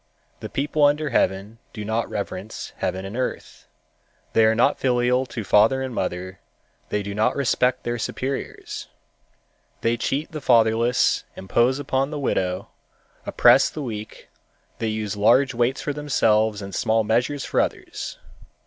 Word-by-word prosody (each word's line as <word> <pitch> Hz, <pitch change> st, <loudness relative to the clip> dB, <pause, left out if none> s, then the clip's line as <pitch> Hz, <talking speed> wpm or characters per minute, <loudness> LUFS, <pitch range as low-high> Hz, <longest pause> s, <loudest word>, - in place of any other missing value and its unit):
The -, -, -7 dB
people 145 Hz, +2 st, 0 dB
under 150 Hz, +1 st, +3 dB
heaven 100 Hz, +1 st, 0 dB
do 105 Hz, -2 st, -6 dB
not 110 Hz, +2 st, -1 dB
reverence 100 Hz, +1 st, -5 dB
Heaven 95 Hz, +1 st, -2 dB
and 100 Hz, +3 st, -7 dB
Earth, 130 Hz, 0 st, -4 dB, 0.7 s
they 110 Hz, -, +5 dB
are 110 Hz, 0 st, +3 dB
not 115 Hz, -, +2 dB
filial 125 Hz, 0 st, +2 dB
to 115 Hz, -2 st, -5 dB
father 110 Hz, +7 st, +4 dB
and 130 Hz, -2 st, -4 dB
mother, 95 Hz, -2 st, -4 dB, 0.5 s
they 105 Hz, -1 st, -1 dB
do 100 Hz, 0 st, -5 dB
not 105 Hz, +2 st, +1 dB
respect 130 Hz, -2 st, +1 dB
their 120 Hz, 0 st, -2 dB
superiors. 135 Hz, +4 st, -4 dB, 0.9 s
They 115 Hz, +1 st, +1 dB
cheat 140 Hz, +6 st, -2 dB
the 155 Hz, -2 st, -6 dB
fatherless, 115 Hz, 0 st, +3 dB
impose 120 Hz, +7 st, +1 dB
upon 135 Hz, -1 st, -1 dB
the 150 Hz, -, -5 dB
widow, 95 Hz, -9 st, -1 dB, 0.6 s
oppress -, -, +5 dB
the 150 Hz, -, -6 dB
weak; 110 Hz, -4 st, -7 dB, 0.5 s
they 115 Hz, -, -1 dB
use 110 Hz, -2 st, -2 dB
large 130 Hz, +6 st, +4 dB
weights 120 Hz, +3 st, 0 dB
for 145 Hz, -, -2 dB
themselves 110 Hz, -8 st, +1 dB
and 100 Hz, 0 st, -8 dB
small 110 Hz, +4 st, +1 dB
measures 125 Hz, +6 st, 0 dB
for -, -, +2 dB
others. -, -, -4 dB
115 Hz, 150 wpm, -23 LUFS, 105-130 Hz, 0.9 s, they